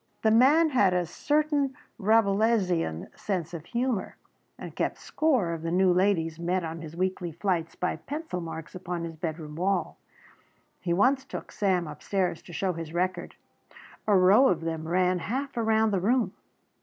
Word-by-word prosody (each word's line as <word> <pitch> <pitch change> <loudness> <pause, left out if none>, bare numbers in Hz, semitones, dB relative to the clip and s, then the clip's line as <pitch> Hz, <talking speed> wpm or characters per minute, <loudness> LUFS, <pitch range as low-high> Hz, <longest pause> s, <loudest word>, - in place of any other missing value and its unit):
The 220 - +4
man 285 +8 +5
had 200 -8 +3
a 180 -1 +1
certain 290 - 0 0.2
Rabelaisian 200 - +1
sense 180 -5 -3
of 165 -2 -7
humour 240 -1 -2 0.4
and - - -9
kept - - -1
score 255 - 0
of 165 - -5
the 165 - -3
new 180 +1 +3
ladies 175 -4 +1
met 180 +2 0
on 165 0 -5
his 160 0 -9
weekly 185 -1 -2
flights 170 -1 -2
by 180 - -2
pencil 290 - -5
marks 165 -1 -7
upon 180 -2 -4
his 165 -1 -6
bedroom 155 -2 -5
wall. 185 0 -1 0.8
He 175 - -3
once 255 +9 +3
took 270 - -8
Sam 185 -4 +1
upstairs 175 +4 -2
to - - -13
show 185 +2 -1
his 165 0 -7
record. 185 +1 -2 0.7
A 205 -2 +5
row 195 +9 +6
of 170 -7 +1
them 160 -1 -4
ran 180 +1 +2
half 265 +9 -3
around 220 -1 +2
the 195 -3 0
room. 240 +4 +1
185 Hz, 165 wpm, -27 LUFS, 170-220 Hz, 0.8 s, row